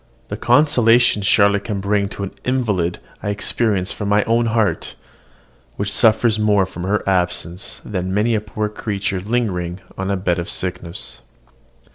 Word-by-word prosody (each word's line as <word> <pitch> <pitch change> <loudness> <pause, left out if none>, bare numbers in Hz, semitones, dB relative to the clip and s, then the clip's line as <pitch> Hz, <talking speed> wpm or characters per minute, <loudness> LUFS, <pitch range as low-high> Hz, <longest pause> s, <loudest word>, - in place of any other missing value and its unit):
The - - -3
consolation 120 -6 +4
Charlotte 100 0 +3
can 105 -3 -2
bring 100 0 0
to 100 - -6
an 95 - -4
invalid 105 -10 0 0.2
I 105 - -3
experience 100 -1 0
from 100 -2 -4
my 105 0 +3
own 115 +1 +1
heart, 110 -2 0 0.8
which 100 0 -3
suffers 110 0 +3
more 105 -2 +3
from 90 -1 -7
her 105 +2 -1
absence 90 -1 -1
than 95 -2 -3
many 105 +4 +1
a 110 - +1
poor 105 0 -3
creature 100 -2 -3
lingering 95 -5 -2 0.2
on 95 0 -2
a 100 - 0
bed 90 -1 0
of 85 - -4
sickness. 90 0 -4
100 Hz, 155 wpm, -20 LUFS, 95-110 Hz, 0.8 s, consolation